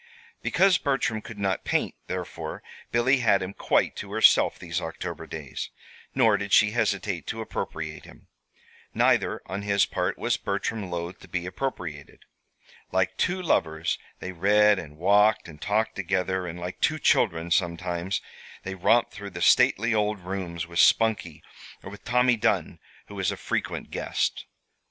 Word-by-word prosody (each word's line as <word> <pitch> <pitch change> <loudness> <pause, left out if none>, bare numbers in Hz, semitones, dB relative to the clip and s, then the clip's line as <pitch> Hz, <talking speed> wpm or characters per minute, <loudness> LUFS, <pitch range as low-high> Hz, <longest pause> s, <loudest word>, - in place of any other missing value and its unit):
Because 190 -1 +3
Bertram 135 -6 0
could 110 - -10
not 95 -2 -1
paint, - - 0
therefore, - - -5 0.3
Billy 125 +4 +3
had 110 -6 +3
him 95 +1 -5
quite - - +1
to - - -7
herself - - +5
these 85 0 -4
October 80 -1 -6
days; 75 -4 -6 0.5
nor 115 -6 +4
did 100 0 -5
she 105 -1 +6
hesitate 100 -8 -1
to 115 - -4
appropriate 110 - -5
him. - - -16 0.7
Neither, - - +2
on 100 +2 -4
his 100 -1 +2
part, - - -2
was - - 0
Bertram 105 -5 -3
loath 85 +1 -5
to - - -14
be 90 -1 -3
appropriated. 90 - -5 0.7
Like 95 0 +1
two 180 - 0
lovers 80 - 0 0.2
they 95 - -5
read 105 +3 +4
and 75 -2 -10
walked 105 +5 +4
and 75 -3 -13
talked 110 +2 0
together, 95 -1 -1
and 85 +1 -6
like 90 +1 -6
two 155 - +2
children, 85 - +2
sometimes, 90 +1 0 0.4
they 95 - -4
romped 115 +6 +2
through 100 -1 -7
the 85 -2 -8
stately 115 +3 +4
old 105 -2 0
rooms 90 -2 -4
with 85 0 -4
Spunkie, 105 -9 +3 0.4
or - - -8
with 100 - -12
Tommy 125 0 +3
Dunn, - - 0 0.3
who - - -12
was 95 -2 -1
a - - -5
frequent - - -3
guest. - - -2
95 Hz, 155 wpm, -26 LUFS, 85-110 Hz, 0.7 s, she